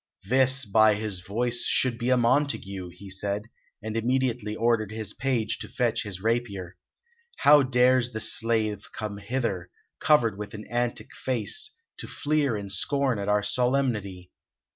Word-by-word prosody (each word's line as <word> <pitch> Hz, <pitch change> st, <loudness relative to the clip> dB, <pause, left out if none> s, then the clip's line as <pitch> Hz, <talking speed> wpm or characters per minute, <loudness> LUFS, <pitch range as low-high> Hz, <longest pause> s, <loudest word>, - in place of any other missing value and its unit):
"This, 130 Hz, +4 st, +2 dB
by 110 Hz, +1 st, +5 dB
his 105 Hz, -3 st, -4 dB
voice, 120 Hz, +6 st, -2 dB
should 125 Hz, -2 st, +1 dB
be 120 Hz, -, -1 dB
a 130 Hz, -, +4 dB
Montague," 115 Hz, -7 st, 0 dB
he 95 Hz, +2 st, -11 dB
said, 100 Hz, +2 st, -2 dB, 0.4 s
and 110 Hz, 0 st, -4 dB
immediately 120 Hz, -2 st, 0 dB
ordered 115 Hz, -2 st, +1 dB
his 110 Hz, -2 st, -4 dB
page 120 Hz, -3 st, -1 dB
to -, -, -6 dB
fetch 120 Hz, -2 st, 0 dB
his 100 Hz, -4 st, -6 dB
rapier. 105 Hz, -5 st, -2 dB, 0.6 s
"How 145 Hz, 0 st, +7 dB
dares 125 Hz, -1 st, +3 dB
the 110 Hz, -, -4 dB
slave 110 Hz, -2 st, 0 dB
come 105 Hz, -2 st, -5 dB
hither, 100 Hz, -5 st, -3 dB, 0.3 s
covered 115 Hz, -10 st, +3 dB
with 105 Hz, 0 st, -6 dB
an 105 Hz, -, -8 dB
antic 120 Hz, 0 st, -2 dB
face, 130 Hz, -, -1 dB, 0.2 s
to -, -, -6 dB
fleer 145 Hz, -5 st, 0 dB
and 100 Hz, -2 st, -6 dB
scorn 135 Hz, +1 st, 0 dB
at 100 Hz, +1 st, -3 dB
our 105 Hz, 0 st, +2 dB
solemnity? 105 Hz, -6 st, -1 dB
115 Hz, 150 wpm, -26 LUFS, 105-125 Hz, 0.6 s, How